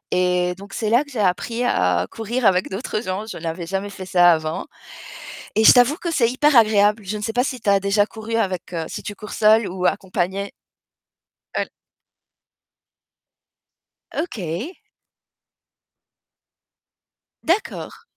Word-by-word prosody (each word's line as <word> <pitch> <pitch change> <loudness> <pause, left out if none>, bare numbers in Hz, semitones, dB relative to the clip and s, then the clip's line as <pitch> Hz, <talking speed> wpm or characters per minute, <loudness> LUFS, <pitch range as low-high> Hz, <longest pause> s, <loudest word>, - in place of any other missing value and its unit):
et 180 0 +1
donc, 200 0 -11
c'est 220 -1 -1
là 245 +5 +4
que 285 - -17
j'ai 265 - -8
appris 210 +5 0
à 90 - +2
courir 230 +2 -3
avec 185 -2 +3
d'autres 210 +2 -3
gens. 190 0 -4
Je 220 - -8
n'avais 165 +1 -4
jamais 195 +3 -3
fait 190 -1 -8
ça 175 -1 +5
avant 155 -1 -2 0.9
et 220 - +3
je - - +11
t'avoue 250 +4 +4
que 340 - -4
c'est 240 -8 +2
hyper 285 +3 +2
agréable. 210 -1 +4
Je 210 +3 -3
ne 210 - -6
sais 225 - -2
pas 245 +1 +2
si 255 -1 -3
tu - - -9
as 200 - +5
déjà 200 +1 +2
couru 225 +1 -6
avec 185 -5 -2
heu, 165 -1 -2
si - - -6
tu 205 - -6
cours 210 +1 -10
seule 215 0 +4
ou 185 0 -4
accompagnée? 190 +1 -2 1.0
Heu, - - 0
l - - -11 2.4
OK. 225 - -4 2.7
D'accord. 360 +6 -2
205 Hz, 150 wpm, -21 LUFS, 185-230 Hz, 2.7 s, je